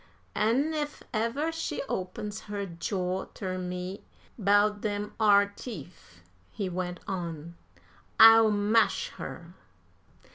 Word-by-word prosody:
"An' 250 +9 +1
ef 295 -1 -4
ever 235 +9 0
she 325 -3 -3
opens 200 +2 -4
her 205 -1 -3
jaw 180 +1 -3
ter 185 -1 -4
me 180 +1 -5 0.3
'bout 205 0 +3
dem 205 -1 -3
ar 205 -2 +5
teef," 175 - -10 0.3
he 200 - -4
went 180 -1 -4
on, 170 -3 -5 0.7
"I'll 225 0 +9
mash 215 - +2
her." - - -8
205 Hz, 110 wpm, -28 LUFS, 185-225 Hz, 0.7 s, I'll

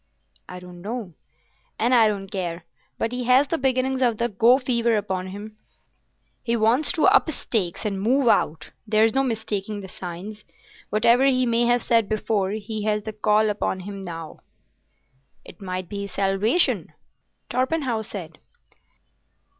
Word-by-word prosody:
"I 180 - -7
don't 180 -1 -12
know, 215 -2 -5 0.6
and 240 +3 +1
I 230 -3 +6
don't 200 -2 -2
care, 175 -3 -4 0.3
but 225 - -1
he 250 0 -3
has 255 +3 +5
the 330 - -1
beginnings 260 0 0
of 240 -4 +2
the 235 +2 0
go 230 +4 +5
fever 235 -3 +1
upon 190 -3 -3
him. 210 +3 -9 0.8
He 235 -1 -1
wants 230 +7 +3
to 320 - +2
up 395 -3 +5
stakes 215 - -2
and 195 -2 -2
move 255 +5 +2
out. 160 -8 +1 0.2
There's 215 +1 +3
no 270 - +3
mistaking 215 -4 -3
the 190 - -8
signs. 190 +4 -8 0.5
Whatever 235 +5 +4
he 255 -2 +3
may 235 0 +2
have 240 0 +2
said 230 -3 +2
before, 210 -2 0
he 215 0 -5
has 210 -1 0
the 220 0 -6
call 215 0 +2
upon 190 -2 -2
him 195 +1 -7
now." 165 -3 -7 1.1
"It - - -14
might 185 -1 -4
be 200 +2 -5
his - - -16
salvation," 200 - +1 0.6
Torpenhow 255 -2 0
said. 175 -7 -8
215 Hz, 155 wpm, -24 LUFS, 195-245 Hz, 1.1 s, I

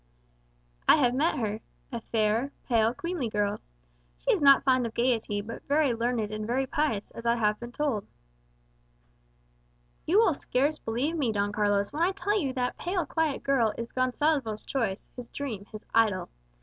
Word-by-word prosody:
"I - - +10
have 250 -5 +3
met 300 +6 +1
her. 215 -2 -2 0.3
A 235 -2 -4
fair, 225 +4 +1 0.2
pale, 225 -2 +3
queenly 325 -1 -3
girl. 205 -1 0 0.6
She - - 0
is - - 0
not 275 -1 +7
fond 255 -3 +3
of 225 - -10
gaiety, 230 -4 +1
but 230 +2 -7
very 285 -3 +3
learned 230 -2 -1
and 215 0 -4
very 260 +3 +1
pious, 295 -8 -1
as 230 - -9
I 235 0 +3
have 210 -2 +1
been 240 0 -7
told." 255 -7 -1 2.0
"You 355 +6 +4
will 435 -6 +5
scarce 280 +2 0
believe 250 +9 -1
me, 250 -6 +1
Don 205 -1 0
Carlos, 205 +1 +1
when 305 - -3
I 365 +3 +3
tell 400 +2 -1
you 295 -11 0
that 250 -1 -2
pale, 360 0 -1
quiet 320 -4 -1
girl 245 -6 +2
is 230 0 -5
Gonsalvo's 255 -3 0
choice, 230 -8 -2
his 245 -2 -8
dream, 230 -9 -5
his 215 0 -9
idol. 220 -4 +2
245 Hz, 175 wpm, -28 LUFS, 220-285 Hz, 2.0 s, I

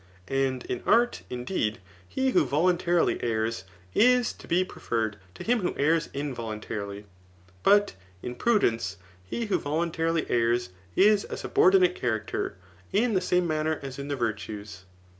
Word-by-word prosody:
And 135 -2 0
in 125 - -3
art, 240 +1 +3
indeed, 125 - -2 0.3
he 265 0 0
who - - +4
voluntarily 175 +3 +2
errs, 110 -4 -1 0.3
is 250 +1 +4
to - - -14
be 180 +2 +2
pre - - -13
ferred 110 -3 -1 0.2
to - - -8
him 245 +1 +2
who 180 - -2
errs 160 +3 +2
involuntarily; 110 -7 -5 0.6
but 205 - +4 0.3
in 125 - -4
prudence 120 - +1 0.3
he 230 - -3
who 210 - +1
voluntarily 165 +2 -1
errs 120 -4 +1 0.3
is 205 0 +4
a - - -4
subordinate 185 -1 +4
character, 110 -9 -2 0.4
in 225 +3 +2
the 185 - +2
same 180 -1 +2
manner 155 0 0
as 135 0 -6
in 140 - -5
the 145 - -1
virtues. 105 -5 -4
145 Hz, 145 wpm, -27 LUFS, 115-185 Hz, 0.6 s, who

